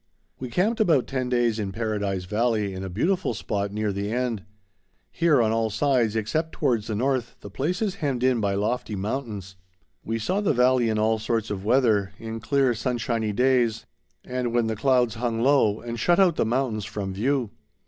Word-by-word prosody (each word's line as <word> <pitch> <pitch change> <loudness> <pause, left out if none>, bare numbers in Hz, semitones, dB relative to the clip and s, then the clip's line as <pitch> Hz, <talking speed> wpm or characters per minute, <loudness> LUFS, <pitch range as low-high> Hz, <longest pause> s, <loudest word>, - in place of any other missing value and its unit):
We 130 - -5
camped 200 - +1
about 160 - +3
ten 130 -2 -3
days 120 -3 +1
in 100 -2 -3
Paradise 105 -3 -2
Valley 105 0 0
in 95 0 -6
a 95 - -5
beautiful 170 - 0
spot 100 -1 -2
near 105 0 -1
the 100 +2 -3
end. 120 -4 -1 0.7
Here, 165 -4 +3
on 110 - +1
all 115 0 +1
sides 120 -1 +1
except 155 +10 -1
towards 120 -7 0
the 110 - -2
north, 130 +1 -1
the 100 - -10
place 170 - -1
is 200 -3 -2
hemmed 135 -5 -1
in 130 -3 +3
by 100 -1 0
lofty 105 +1 -1
mountains. 100 -3 -4 0.5
We 115 +1 -2
saw 185 - -1
the 205 - +2
valley 125 -1 +3
in 110 - 0
all 110 +1 +2
sorts 115 0 -1
of 95 -2 -4
weather, 110 -5 +2
in 115 0 -6
clear 135 0 +2
sunshiny 115 -2 -1
days, 125 0 +2 0.4
and 125 -2 -2
when 120 -1 +3
the 110 0 -1
clouds 125 -1 +2
hung 115 -1 -2
low 130 -6 +3
and 120 0 -5
shut 175 - +3
out 180 -4 +4
the - - +1
mountains 115 -4 -1
from 100 -2 -4
view. 120 +2 0
115 Hz, 190 wpm, -25 LUFS, 105-130 Hz, 0.7 s, out